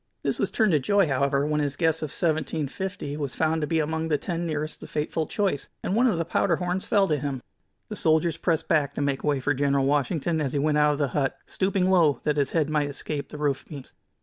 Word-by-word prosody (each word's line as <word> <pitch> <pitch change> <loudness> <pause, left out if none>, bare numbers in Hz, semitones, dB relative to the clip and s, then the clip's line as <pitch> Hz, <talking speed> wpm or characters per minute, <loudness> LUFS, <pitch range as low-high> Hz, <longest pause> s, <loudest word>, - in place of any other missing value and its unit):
This - - -1
was - - +1
turned 220 -3 +2
to 155 - +4
joy, 200 +5 +3
however, 140 +1 +1
when 150 0 0
his 145 -1 -1
guess 160 0 +1
of 155 - -3
"1750" 160 0 -2
was 140 -4 -3
found 160 0 +1
to 150 - -1
be 165 - 0
among 160 +1 -1
the 150 -2 +2
ten 170 +1 -3
nearest 155 -1 -3
the - - -8
fateful 155 +1 -2
choice, 195 -9 -1
and 190 - -1
one 245 +3 +4
of 215 - +1
the 165 - -1
powder 170 +1 +1
horns 180 +2 -2
fell 200 -2 +3
to 150 -4 0
him. 140 -1 -3 0.5
The - - -6
soldiers 160 +1 +2
pressed 165 -3 0
back 150 -4 +1
to - - -2
make 140 -1 -1
way 145 -2 +1
for 145 +3 +1
General 140 0 +1
Washington 150 +3 0
as 135 -3 -2
he - - 0
went 150 +1 +2
out 150 0 +4
of - - -3
the 140 -2 0
hut, 135 +1 -1
stooping 190 -1 0
low 165 -6 +4
that 150 -1 0
his 140 -2 +1
head 160 -3 +1
might 150 -2 0
escape 145 +1 -5
the 150 - -8
roof 145 -2 -1
beams. 140 -4 -10
150 Hz, 245 wpm, -26 LUFS, 145-165 Hz, 0.5 s, to